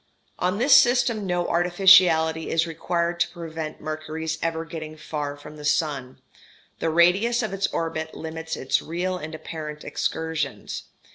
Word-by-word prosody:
] - - -39
On 195 - -2
this 255 +6 +6
system 240 -4 +4
no 175 -1 0
artificiality 175 -2 +5
is 165 0 +2
required 170 +1 -2
to - - +2
prevent 160 -2 -6
Mercury's 155 +1 -4
ever 165 0 -2
getting 155 -1 -7
far 150 -1 -4
from 150 +1 -12
the 150 - -10
sun: 145 -4 -1 0.6
the 165 - 0
radius 190 +9 +3
of 215 -3 -3
its 195 +1 0
orbit 160 -1 -3
limits 160 0 -5
its 130 - +1
real 180 +3 -2
and 155 0 -6
apparent 155 -1 -7
excursions. 160 -1 -3
160 Hz, 150 wpm, -24 LUFS, 155-175 Hz, 0.6 s, this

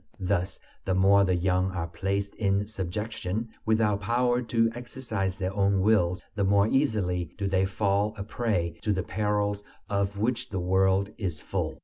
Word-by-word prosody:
Thus 95 0 -1 0.3
the 95 - 0
more 100 +1 +5
the 95 -2 +2
young 90 +1 +1
are 85 -3 -2
placed 95 +4 -2
in 100 -1 +1
subjection, 105 +2 -4 0.2
without 110 -2 +2
power 120 +3 +1
to 115 -1 +1
exercise 115 -6 -3
their 95 -1 -2
own 100 -1 +2
wills, 95 -4 +2
the 105 - -1
more 100 +1 +4
easily 100 - +1
do 100 - -2
they 95 0 +2
fall 100 +2 0
a 100 - -4
prey 100 -7 -1
to 105 - +1
the 95 -2 -1
perils 105 +1 -1 0.3
of 100 0 0
which 115 +3 -1
the 95 - -3
world 95 +2 +2
is 90 -7 -3
full. - - -3
100 Hz, 165 wpm, -27 LUFS, 95-110 Hz, 0.3 s, more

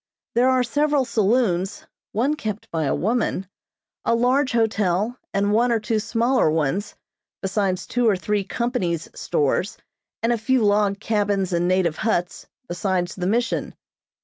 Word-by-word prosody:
There 245 +2 +4
are 255 -1 +3
several 290 +2 +1
saloons 205 -5 +1 0.3
(one 260 +8 +1
kept 220 -7 -5
by 160 -2 -1
a 140 - +1
woman), 215 -3 -1 0.6
a 230 - +2
large 255 +3 +2
hotel 215 -2 +1 0.2
and 200 +1 +1
one 240 +3 +3
or 230 - +2
two 220 0 -1
smaller 235 -1 +2
ones, 160 +6 -1 0.5
besides 195 -1 0
two 245 -2 +1
or 205 - +3
three 205 +2 -1
company's 190 - -2
stores 150 +7 -1 0.5
and 235 +1 +3
a 235 - -2
few 255 +2 +2
log 205 -1 +2
cabins 205 -4 0
and 175 +1 +1
native 180 -3 +1
huts, 180 -6 -1 0.2
besides 175 0 -1
the 180 -1 -3
Mission. 230 +3 -1
210 Hz, 150 wpm, -23 LUFS, 185-235 Hz, 0.6 s, There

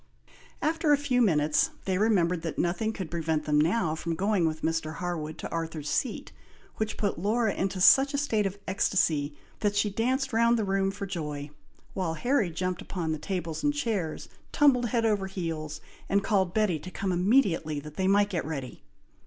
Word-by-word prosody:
After 320 -1 +1
a 290 - +6
few 270 -3 +1
minutes, 155 -8 +3 0.2
they 190 -1 0
remembered 180 -6 +2
that 165 -1 -4
nothing 190 +6 0
could 190 -7 -6
prevent 160 -2 -1
them 150 -1 +3
now 165 0 +1
from 165 +1 -3
going 195 -2 +1
with 155 0 -4
Mr. 160 -1 -1
Harwood 160 -4 -4
to - - -6
Arthur's 160 -3 -4
Seat, 250 -5 -2 0.5
which 220 0 -2
put 200 -5 -1
Laura 215 +3 +1
into 190 0 -2
such 275 +9 +6
a - - +1
state 220 -8 +1
of 195 +1 -6
ecstacy, 155 -6 +1 0.2
that 205 -1 0
she 205 0 +1
danced 260 +5 0
round 235 +1 +4
the 220 - 0
room 195 0 +1
for 200 0 -5
joy, 150 -6 -5 0.4
while 175 -4 -2
Harry 240 - +1
jumped 180 +2 -3
upon 170 -4 -3
the 155 - -2
tables 170 -4 -3
and 290 0 +2
chairs, 215 - -2 0.2
tumbled 260 -5 +4
head 230 0 0
over 205 -3 +1
heels, 160 -5 -4 0.3
and 200 0 +2
called 190 -5 +1
Betty 200 -6 +1
to 185 - -8
come 190 +1 -3
immediately 180 - +2
that 150 +1 -10
they 190 - +1
might 205 +1 +3
get 170 -4 -1
ready. 140 -5 -6
190 Hz, 185 wpm, -28 LUFS, 160-220 Hz, 0.5 s, a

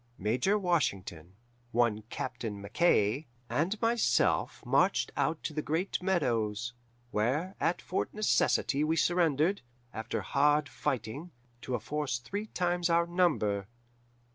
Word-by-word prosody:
Major 125 - +1
Washington, 95 - -1 0.4
one 115 -3 +2
Captain 115 -5 -4
Mackaye, 105 +3 +2 0.2
and 165 - 0
myself 230 0 +2
marched - - +2
out 160 -1 0
to 155 - -3
the 155 - -1
Great 165 +7 -1
Meadows, 120 - 0 0.4
where 140 - 0
at 175 - 0
Fort 185 - -2
Necessity 205 -8 +2
we 160 +1 +1
surrendered, 170 +2 +2 0.3
after 110 +1 -3
hard 145 +1 +2
fighting, 135 - -3 0.3
to 125 - -2
a - - -2
force 140 +3 -2
three 200 - -5
times 175 -2 0
our 170 0 +4
number. 150 - +1
150 Hz, 120 wpm, -30 LUFS, 115-175 Hz, 0.4 s, our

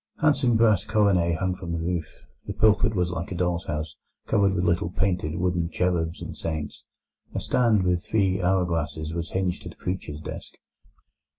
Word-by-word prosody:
Handsome 135 -6 +3
brass 110 -4 +4
coronae 100 -5 +2
hung 95 +1 0
from 90 -2 -6
the - - -1
roof; 85 -1 -4 0.2
the - - -3
pulpit 110 0 +3
was 90 -2 +1
like 85 +1 -4
a - - -3
doll's 85 -1 -1
house 75 0 -3 0.3
covered 100 -1 +2
with 85 - 0
little 85 -1 +1
painted 90 -4 -1
wooden 90 -1 0
cherubs 85 -2 -1
and - - -6
saints; 80 -3 -4 0.5
a - - +1
stand 115 -6 +2
with 90 -1 +1
three 95 -3 +1
hour 90 0 +2
glasses 80 -2 -2
was 85 -1 -3
hinged 95 -2 -1
to - - -8
the - - -13
preacher's 90 -5 -4
desk. 80 - -8
90 Hz, 180 wpm, -25 LUFS, 85-95 Hz, 0.5 s, brass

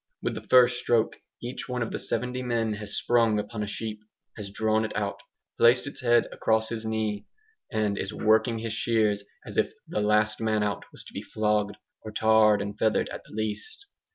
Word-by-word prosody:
With - - 0
the - - -5
first 125 -1 +6
stroke 115 -2 +1 0.3
each 125 +2 -6
one 125 -1 -1
of 115 - -5
the - - -3
seventy 125 +2 -2
men 115 -3 0
has 105 -1 -5
sprung 115 -3 +3
upon 105 +1 -4
a 105 - -2
sheep 105 +1 -4 0.4
has 105 -2 -7
drawn 110 +2 +1
it 110 - -4
out 100 -1 -2 0.4
placed 120 +3 +6
its 145 - -7
head 120 -2 +4
across 110 0 +1
his 110 -1 -4
knee 110 -2 -2 0.4
and 105 -3 0
is 95 - -3
working 110 +2 +2
his 110 0 -4
shears 110 -2 +1 0.2
as - - -2
if - - 0
the 105 - -1
"last 105 +1 +2
man 110 -1 +1
out" 100 -4 -2
was - - -9
to - - -14
be - - -4
flogged, 105 -1 0 0.3
or 110 - -7
tarred 110 -1 +4
and 100 +1 -7
feathered 110 -1 +2
at - - -6
the - - -13
least. 110 - -4
110 Hz, 200 wpm, -27 LUFS, 105-115 Hz, 0.4 s, first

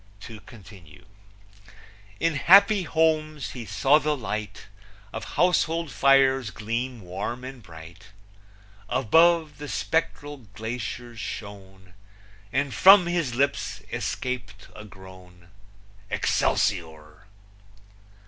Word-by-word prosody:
To 110 +1 -10
continue: 95 -6 -16 1.1
In 165 0 +1
happy 200 +7 +5
homes 155 -2 0
he 120 -3 -8
saw 135 +10 +3
the 150 -1 -1
light 110 -3 -6 0.5
Of 110 - -7
household 165 -3 +1
fires 135 -2 +3
gleam 115 +3 -4
warm 100 +7 -6
and 130 -1 -9
bright; 85 +2 -14 0.8
Above, 155 +4 +3
the 145 - -7
spectral 145 -2 -2 0.2
glaciers 115 +1 -6
shone, 95 -4 -9 0.6
And 140 0 -1
from 195 -1 +7
his 170 -8 -2
lips 140 +2 -1
escaped 110 -6 -5
a 105 - -10
groan, 95 -3 -15 0.6
Excelsior! 80 +1 -1
120 Hz, 95 wpm, -25 LUFS, 100-150 Hz, 1.1 s, from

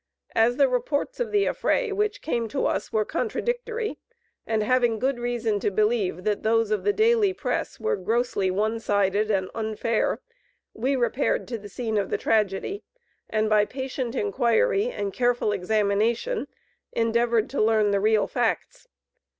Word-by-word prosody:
As 235 +2 +3
the 280 -2 +5
reports 285 - -1
of 470 -3 -2
the 410 -1 +3
affray 485 -4 0
which 420 +1 -1
came 235 -7 -1
to 270 +5 -2
us - - -1
were 215 -1 +1
contradictory, 470 - -2 0.5
and 220 -1 +1
having 240 0 +2
good 260 +2 0
reason 235 -3 -1
to - - 0
believe 210 -3 0
that 210 0 0
those 225 -1 +2
of 215 - 0
the 410 - +3
daily 435 -2 +3
press - - -3
were 450 +1 0
grossly 230 - 0
one 215 +4 0
sided 205 0 +1
and 190 -3 0
unfair, 220 0 -1 0.5
we 260 +5 0
repaired 255 +2 0
to 235 -2 -3
the 205 0 -10
scene 220 0 -2
of 195 - -2
the - - 0
tragedy, 215 - 0 0.5
and, 215 0 +1
by 215 -1 +4
patient 260 +1 -4
inquiry 420 - +2
and 200 - -4
careful 245 -3 +1
examination, 215 - 0 0.4
endeavored 230 0 +1
to 275 - 0
learn 215 -1 +3
the 200 - +2
real 215 +1 +3
facts. - - -2
230 Hz, 160 wpm, -25 LUFS, 215-285 Hz, 0.5 s, the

